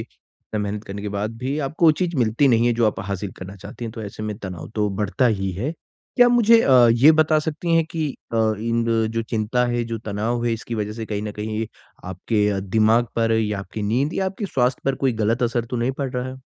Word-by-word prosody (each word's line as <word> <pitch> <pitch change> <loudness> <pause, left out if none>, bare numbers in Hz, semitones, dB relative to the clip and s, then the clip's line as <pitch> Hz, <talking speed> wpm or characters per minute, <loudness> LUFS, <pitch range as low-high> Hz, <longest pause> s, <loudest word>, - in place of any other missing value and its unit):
इतना 110 - -10
मेहनत 105 +1 -4
करने 100 0 -7
के 105 - -3
बाद 105 +3 -3
भी 135 +4 -2
आपको 150 +4 +1
वो 155 - +7
चीज़ 170 0 -2
मिलती 120 +3 +3
नहीं 115 0 +3
है 120 - +3
जो 115 -1 +2
आप 105 - -1
हासिल 100 0 -3
करना 95 +2 -9
चाहती 120 +5 -9
हैं 110 - -5
तो 115 - -7
ऐसे 105 +1 -7
में 105 -1 -3
तनाव 95 -6 -7
तो 105 -1 +1
बढ़ता 105 +5 +1
ही 95 -4 0
है। 120 - -3 0.4
क्या 245 -1 +7
आप 245 - +3
मुझे 230 -1 +6
अ, 125 -3 +6
ये 135 +7 +6
बता 155 0 +3
सकती 160 +2 -1
हैं 165 -1 +4
कि 160 -3 -1 0.2
अ, - - 0 0.2
इन 115 0 0 0.3
जो 115 0 -1
चिंता 115 +2 0
है, 120 0 0
जो 115 -1 -4
तनाव 110 +3 -2
है, 120 - +1
इसकी 115 +1 -5
वजह 105 -1 -3
से 110 0 -6
कहीं 105 -1 -3
न 105 -1 -4
कहीं 110 +1 -3 0.4
आपके 100 +2 0
दिमाग 110 +3 +3
पर 115 0 +2
या 105 -2 0
आपकी 105 +2 -6
नींद 125 +9 0
या 190 - 0
आपके 195 +2 -4
स्वास्थ्य 125 -5 0
पर 135 - +1
कोई 130 - +3
गलत 115 +4 +1
असर 120 0 0
तो 125 - -2
नहीं 120 +3 0
पड़ 135 -2 -2
रहा 125 0 -3
है? 130 - -7
115 Hz, 245 wpm, -22 LUFS, 105-130 Hz, 0.4 s, वो